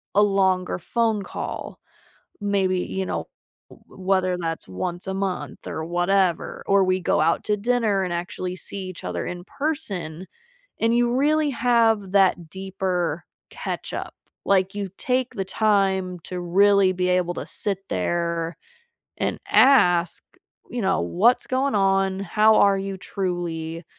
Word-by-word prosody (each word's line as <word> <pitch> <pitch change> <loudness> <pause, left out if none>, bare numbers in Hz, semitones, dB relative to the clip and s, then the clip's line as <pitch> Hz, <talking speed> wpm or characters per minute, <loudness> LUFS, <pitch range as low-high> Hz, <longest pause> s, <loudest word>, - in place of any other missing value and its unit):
a 205 - +6
longer 190 -3 +1
phone 220 +2 0
call - - -6 0.6
maybe, 195 -2 +1
you 190 0 -3
know, - - -3 0.4
w - - -17 0.2
whether 185 -1 +2
that's 165 -2 -4
once 175 - -5
a 190 - -2
month, 195 -1 -4
or 160 - -4
whatever, 175 +1 +1
or 200 0 +4
we 185 0 +1
go 170 - +1
out 165 +2 +2
to 210 - +2
dinner 215 -3 +1
and 180 - -3
actually 180 +1 -4
see 200 - -8
each 185 - -9
other 85 -1 -3
in 175 0 -6
person 195 - -4 0.5
and 230 +1 +3
you 240 0 +2
really 300 +3 +2
have 230 -6 +2
that 185 -4 +3
deeper 185 -4 -2 0.3
catch-up, - - -5 0.3
like 195 0 +2
you 200 -1 -3
take 255 0 -1
the 195 - -2
time 190 -3 +1
to 180 +2 -6
really 195 +2 +4
be 180 0 -1
able 180 -1 +1
to - - -5
sit 200 -3 -3
there 170 - -1 0.6
and - - -1
ask, 175 -11 +4 0.5
you 245 - -3
know, 190 0 +2
"What's 230 +8 +2
going 260 -1 0
on? 195 -1 +2
How 215 +3 +4
are 200 -1 +5
you 195 0 -4
truly?" 170 -4 -4
190 Hz, 145 wpm, -23 LUFS, 175-205 Hz, 0.6 s, a